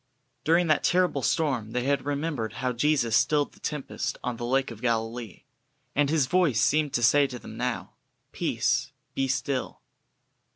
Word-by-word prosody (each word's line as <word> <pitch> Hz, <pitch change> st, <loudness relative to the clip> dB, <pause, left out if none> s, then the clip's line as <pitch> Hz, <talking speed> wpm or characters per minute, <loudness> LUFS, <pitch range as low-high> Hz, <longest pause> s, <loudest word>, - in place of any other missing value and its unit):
During 170 Hz, +3 st, +3 dB
that 155 Hz, -3 st, +2 dB
terrible 180 Hz, 0 st, +2 dB
storm 130 Hz, -9 st, 0 dB
they 125 Hz, -, 0 dB
had 140 Hz, +1 st, 0 dB
remembered 145 Hz, -6 st, -2 dB
how 125 Hz, -1 st, -2 dB
Jesus 120 Hz, -3 st, +2 dB
stilled 145 Hz, +4 st, +2 dB
the -, -, -21 dB
tempest 135 Hz, -4 st, -4 dB
on 125 Hz, -1 st, -3 dB
the 120 Hz, -, -4 dB
Lake 135 Hz, 0 st, +1 dB
of 115 Hz, -1 st, -10 dB
Galilee, 115 Hz, -2 st, -2 dB, 0.5 s
and 145 Hz, -1 st, +3 dB
His 155 Hz, -3 st, +3 dB
voice 150 Hz, -4 st, +2 dB
seemed 150 Hz, +3 st, +2 dB
to 120 Hz, -, 0 dB
say 140 Hz, +4 st, +5 dB
to 125 Hz, -, -7 dB
them -, -, -10 dB
now: -, -, -3 dB, 0.4 s
"Peace, -, -, 0 dB, 0.2 s
be 135 Hz, -, 0 dB
still." 130 Hz, +1 st, -2 dB
135 Hz, 165 wpm, -27 LUFS, 120-150 Hz, 0.5 s, say